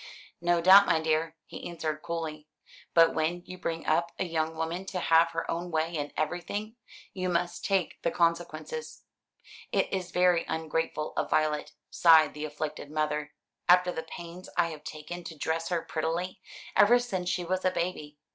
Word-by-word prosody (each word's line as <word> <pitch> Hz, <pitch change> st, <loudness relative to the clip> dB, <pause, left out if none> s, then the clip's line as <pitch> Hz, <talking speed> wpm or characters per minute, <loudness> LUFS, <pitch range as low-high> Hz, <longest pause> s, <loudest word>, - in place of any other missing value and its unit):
"No 175 Hz, 0 st, +2 dB
doubt, 195 Hz, +3 st, +8 dB
my 160 Hz, -, +3 dB
dear," 160 Hz, 0 st, 0 dB
he -, -, -8 dB
answered 155 Hz, -3 st, -3 dB
coolly; 155 Hz, -2 st, -5 dB, 0.5 s
"but 165 Hz, -1 st, +6 dB
when 170 Hz, +3 st, -1 dB
you 185 Hz, 0 st, -9 dB
bring 165 Hz, 0 st, -3 dB
up 170 Hz, +2 st, +1 dB
a -, -, 0 dB
young 160 Hz, -1 st, -1 dB
woman 165 Hz, +3 st, -3 dB
to 185 Hz, -, -3 dB
have 165 Hz, 0 st, +4 dB
her 165 Hz, 0 st, -3 dB
own 175 Hz, +1 st, -3 dB
way 160 Hz, 0 st, -1 dB
in 145 Hz, -2 st, -3 dB
everything, 200 Hz, +7 st, -3 dB, 0.4 s
you 185 Hz, -1 st, -2 dB
must 175 Hz, 0 st, -1 dB
take 190 Hz, -5 st, 0 dB
the 170 Hz, -, +1 dB
consequences." 170 Hz, -, -2 dB, 0.7 s
"It -, -, +1 dB
is 185 Hz, -2 st, -2 dB
very 180 Hz, -1 st, +3 dB
ungrateful 160 Hz, -1 st, -2 dB
of -, -, -1 dB
Violet," 155 Hz, -1 st, 0 dB, 0.2 s
sighed 160 Hz, -3 st, +6 dB
the 150 Hz, +1 st, -5 dB
afflicted 150 Hz, -1 st, -5 dB
mother, 150 Hz, 0 st, -2 dB, 0.4 s
"after 180 Hz, 0 st, +6 dB
the 160 Hz, -, -4 dB
pains 170 Hz, +2 st, -9 dB
I 170 Hz, -1 st, +3 dB
have 155 Hz, -2 st, -9 dB
taken 160 Hz, +3 st, -7 dB
to 160 Hz, -, -8 dB
dress 165 Hz, +2 st, -1 dB
her 170 Hz, -2 st, 0 dB
prettily, 165 Hz, +3 st, -3 dB, 0.3 s
ever 235 Hz, +4 st, +7 dB
since 190 Hz, -8 st, -2 dB
she 180 Hz, -, -1 dB
was 185 Hz, +2 st, -1 dB
a 185 Hz, -, +4 dB
baby. 170 Hz, -5 st, -3 dB
165 Hz, 175 wpm, -29 LUFS, 155-180 Hz, 0.7 s, doubt